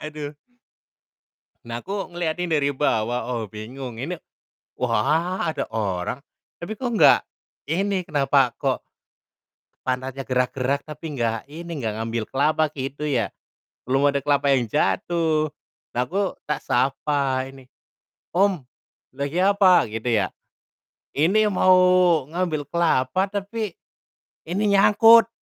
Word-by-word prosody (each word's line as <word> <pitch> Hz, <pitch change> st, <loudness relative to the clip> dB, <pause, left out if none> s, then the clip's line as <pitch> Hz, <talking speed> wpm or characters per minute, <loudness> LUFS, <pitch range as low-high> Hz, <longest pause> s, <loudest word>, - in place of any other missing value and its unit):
Aduh. 150 Hz, -1 st, -6 dB, 1.3 s
Nah, 120 Hz, 0 st, -5 dB
aku 195 Hz, -2 st, -5 dB
ngeliatin 175 Hz, +1 st, -2 dB
dari 140 Hz, -1 st, +2 dB
bawah, 120 Hz, -4 st, 0 dB
oh, 115 Hz, -, -2 dB
bingung, 115 Hz, +3 st, -8 dB
ini, 160 Hz, +8 st, -3 dB, 0.7 s
wah, 150 Hz, -, +1 dB
ada 140 Hz, -, -4 dB
orang, 100 Hz, 0 st, -2 dB, 0.4 s
tapi 170 Hz, +5 st, -6 dB
kok 245 Hz, +3 st, -3 dB
nggak 145 Hz, -6 st, +7 dB, 0.5 s
ini, 195 Hz, +4 st, 0 dB
kenapa 135 Hz, -3 st, +2 dB
kok -, -, -1 dB, 1.0 s
pantatnya 130 Hz, +1 st, -2 dB
gerak-gerak 130 Hz, +2 st, 0 dB
tapi 155 Hz, +1 st, -8 dB
nggak 115 Hz, -2 st, -1 dB
ini, 170 Hz, +3 st, -9 dB
nggak 110 Hz, -2 st, -2 dB
ngambil 115 Hz, -1 st, -2 dB
kelapa 155 Hz, +3 st, +2 dB
gitu 135 Hz, +3 st, -4 dB
ya, 115 Hz, -9 st, 0 dB, 0.6 s
belum 135 Hz, +2 st, +3 dB
ada 140 Hz, -, +1 dB
kelapa 140 Hz, -1 st, +2 dB
yang 125 Hz, -2 st, +2 dB
jatuh, 155 Hz, -, +1 dB, 0.4 s
aku 180 Hz, +11 st, 0 dB, 0.2 s
tak 150 Hz, -, -1 dB
sapa 135 Hz, 0 st, 0 dB
ini, 135 Hz, -2 st, -15 dB, 0.7 s
"Om, 195 Hz, 0 st, +3 dB, 0.6 s
lagi 140 Hz, +5 st, -3 dB
apa?" 190 Hz, -4 st, +5 dB
Gitu 110 Hz, +2 st, -4 dB
ya. 95 Hz, -, +1 dB, 0.9 s
"Ini 195 Hz, +9 st, +3 dB
mau 185 Hz, -1 st, +4 dB, 0.6 s
ngambil 160 Hz, -4 st, -2 dB
kelapa, 170 Hz, 0 st, +1 dB
tapi 205 Hz, +1 st, -3 dB, 0.8 s
ini 195 Hz, +5 st, -1 dB
nyangkut." 225 Hz, +4 st, +7 dB
145 Hz, 115 wpm, -23 LUFS, 125-175 Hz, 1.3 s, nggak